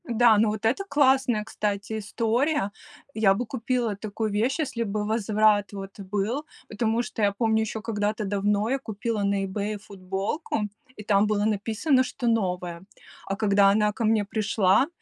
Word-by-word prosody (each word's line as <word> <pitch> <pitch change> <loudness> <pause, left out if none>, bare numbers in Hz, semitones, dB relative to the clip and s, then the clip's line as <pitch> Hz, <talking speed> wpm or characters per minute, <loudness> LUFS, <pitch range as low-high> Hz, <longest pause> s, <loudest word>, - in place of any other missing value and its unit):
Да, 235 -1 +5
ну 215 +1 +3
вот 215 +1 -4
это 250 - +1
классная, 265 -6 +3
кстати, 210 0 -3
история. 230 +3 0 0.4
Я 215 -3 +4
бы 245 +6 -2
купила 235 -2 -1
такую 215 +1 -3
вещь, 235 +9 0
если 250 -6 -1
бы 210 -1 -2
возврат 215 -1 +2
вот 195 0 -8
был, 205 +9 -2 0.2
потому 225 +2 0
что 225 - -6
я 205 -1 +3
помню, 220 +2 +1
еще 220 0 -3
когда-то 210 -1 -2
давно 205 +2 0
я 270 +2 0
купила 220 -2 -3
на 200 0 +1
"И - - 0
Бэе" 205 +2 -3
футболку, 195 - -4 0.3
и 210 - -9
там 205 0 +3
было 210 -1 +1
написано, 220 +6 +1
что 250 -1 -4
новая. 180 -6 -1 0.5
А 195 - -1
когда 200 -1 +4
она 210 +1 +3
ко 225 - -4
мне 215 -1 +2
пришла, 210 +2 +2
215 Hz, 170 wpm, -26 LUFS, 200-230 Hz, 0.5 s, Да